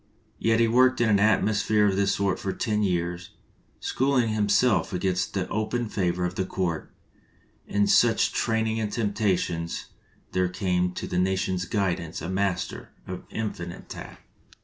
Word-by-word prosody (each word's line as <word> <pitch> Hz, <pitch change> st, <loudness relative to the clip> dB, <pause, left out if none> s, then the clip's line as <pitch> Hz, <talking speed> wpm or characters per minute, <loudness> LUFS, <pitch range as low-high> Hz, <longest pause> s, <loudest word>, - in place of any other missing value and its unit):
Yet 115 Hz, 0 st, +2 dB
he 115 Hz, -, +4 dB
worked 130 Hz, +3 st, +4 dB
in 120 Hz, -2 st, +3 dB
an 100 Hz, -2 st, +4 dB
atmos 110 Hz, 0 st, +3 dB
phere 105 Hz, -1 st, +3 dB
of 100 Hz, -2 st, +2 dB
this 100 Hz, 0 st, +2 dB
sort 100 Hz, -2 st, 0 dB
for 95 Hz, -, -2 dB
ten 105 Hz, -3 st, -1 dB
years, 90 Hz, -2 st, -2 dB, 0.4 s
schooling 130 Hz, -3 st, +1 dB
him 105 Hz, -1 st, 0 dB
self 110 Hz, -1 st, +3 dB
against 90 Hz, +1 st, -1 dB
the 95 Hz, -2 st, -1 dB
open 110 Hz, +2 st, -1 dB
favor 90 Hz, -3 st, 0 dB
of 90 Hz, -, -2 dB
the 95 Hz, -, -1 dB
court; 90 Hz, -3 st, -3 dB, 0.8 s
and 100 Hz, 0 st, +1 dB
of -, -, +1 dB
such 115 Hz, -2 st, +4 dB
training 110 Hz, -1 st, 0 dB
and 105 Hz, -2 st, -2 dB
temptations 100 Hz, -7 st, -1 dB, 0.4 s
there 90 Hz, -1 st, +1 dB
came 90 Hz, -1 st, 0 dB
to -, -, -5 dB
the 90 Hz, -, -1 dB
nation's 95 Hz, -1 st, 0 dB
guidance 85 Hz, -4 st, -1 dB
a 85 Hz, -, -5 dB
master 95 Hz, 0 st, -2 dB, 0.2 s
of 95 Hz, 0 st, -7 dB
infinite 90 Hz, -6 st, -5 dB
tact. -, -, -9 dB
100 Hz, 165 wpm, -26 LUFS, 90-110 Hz, 0.8 s, he